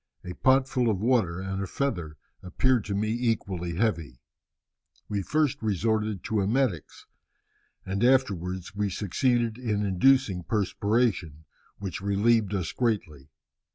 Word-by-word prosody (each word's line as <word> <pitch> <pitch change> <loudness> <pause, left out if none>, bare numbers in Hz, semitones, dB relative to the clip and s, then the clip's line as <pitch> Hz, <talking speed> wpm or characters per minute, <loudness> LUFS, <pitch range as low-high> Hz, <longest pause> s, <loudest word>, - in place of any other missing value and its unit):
A 90 - -6
pot 130 +5 +3
full 125 -3 +1
of 100 -4 0
water 110 -7 +1
and 95 0 -4
a 100 - -3
feather 85 - -3 0.2
appeared 120 +5 +1
to 100 - -3
me 105 +2 0
equally 100 -8 -2
heavy. 80 - -1 0.9
We 100 -1 -2
first 150 +6 0
resorted 110 -1 -1
to 110 -2 0
emetics, 105 - -1 0.8
and 100 +3 -2
afterwards 95 -8 +1
we 105 -1 0
succeeded 115 +5 0
in 105 -4 -1
inducing 100 0 +3
perspiration, 100 - 0 0.3
which 95 -2 -5
relieved 105 +1 +2
us 90 -4 -2
greatly. 80 - -2
105 Hz, 125 wpm, -27 LUFS, 90-120 Hz, 0.9 s, pot